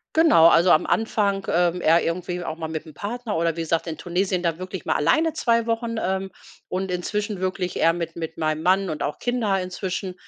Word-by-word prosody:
Genau, 315 Hz, -, +6 dB
also 170 Hz, +2 st, +5 dB
am 155 Hz, -, +4 dB
Anfang, 200 Hz, -3 st, 0 dB
ähm, 175 Hz, +1 st, +1 dB
eher 165 Hz, +2 st, +4 dB
irgendwie 175 Hz, +1 st, -3 dB
auch 160 Hz, -, -4 dB
mal 160 Hz, -1 st, -5 dB
mit 160 Hz, 0 st, -5 dB
'm 155 Hz, -, -12 dB
Partner 225 Hz, -, -4 dB
oder 165 Hz, -1 st, 0 dB
wie 165 Hz, -, -3 dB
gesagt, 165 Hz, +1 st, -1 dB
in 160 Hz, -, -5 dB
Tunesien 180 Hz, +1 st, -1 dB
da 170 Hz, -2 st, -1 dB
wirklich 185 Hz, -2 st, -7 dB
mal -, -, +2 dB
alleine 320 Hz, -, +2 dB
2 230 Hz, -6 st, +1 dB
Wochen, 230 Hz, 0 st, -2 dB
ähm, 190 Hz, +1 st, -2 dB, 0.4 s
und 190 Hz, +1 st, -3 dB
inzwischen 205 Hz, +2 st, -3 dB
wirklich 185 Hz, -1 st, -2 dB
eher 165 Hz, -, +4 dB
mit 165 Hz, -1 st, -5 dB
mit 160 Hz, -1 st, -6 dB
meinem 155 Hz, -1 st, -1 dB
Mann 190 Hz, +2 st, +2 dB
und 155 Hz, -, -4 dB
auch 150 Hz, -, -3 dB
Kinder 225 Hz, -6 st, 0 dB
inzwischen. 185 Hz, 0 st, -4 dB
180 Hz, 210 wpm, -23 LUFS, 165-200 Hz, 0.4 s, Genau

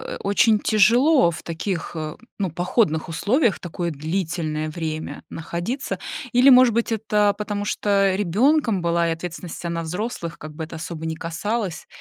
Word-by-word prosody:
э, -, -, -6 dB
очень 210 Hz, +2 st, +3 dB
тяжело 240 Hz, -, +4 dB
в 160 Hz, -, -8 dB
таких, 170 Hz, +1 st, -3 dB
э, 155 Hz, -1 st, -4 dB, 0.2 s
ну, 190 Hz, -3 st, 0 dB
походных 175 Hz, -1 st, +1 dB
условиях 210 Hz, -, +1 dB
такое 175 Hz, 0 st, -4 dB
длительное 155 Hz, 0 st, -2 dB
время 155 Hz, -1 st, -5 dB
находиться. 180 Hz, -, -4 dB, 0.3 s
Или, 255 Hz, +3 st, +6 dB
может 250 Hz, -2 st, +7 dB
быть, 235 Hz, +1 st, 0 dB
это 210 Hz, -2 st, +2 dB
потому, 205 Hz, -1 st, -3 dB
что 195 Hz, -2 st, +2 dB
ребёнком 215 Hz, -, +2 dB
была 170 Hz, 0 st, +1 dB
и 165 Hz, -, 0 dB
ответственность 165 Hz, 0 st, -6 dB
вся 170 Hz, -, -4 dB
на 170 Hz, 0 st, -2 dB
взрослых, 175 Hz, -1 st, -4 dB
как 155 Hz, 0 st, -9 dB
бы, 160 Hz, -, -5 dB
это 165 Hz, +1 st, -7 dB
особо 160 Hz, 0 st, -6 dB
не 160 Hz, 0 st, -2 dB
касалось? 185 Hz, +3 st, -3 dB
180 Hz, 160 wpm, -23 LUFS, 165-215 Hz, 0.3 s, может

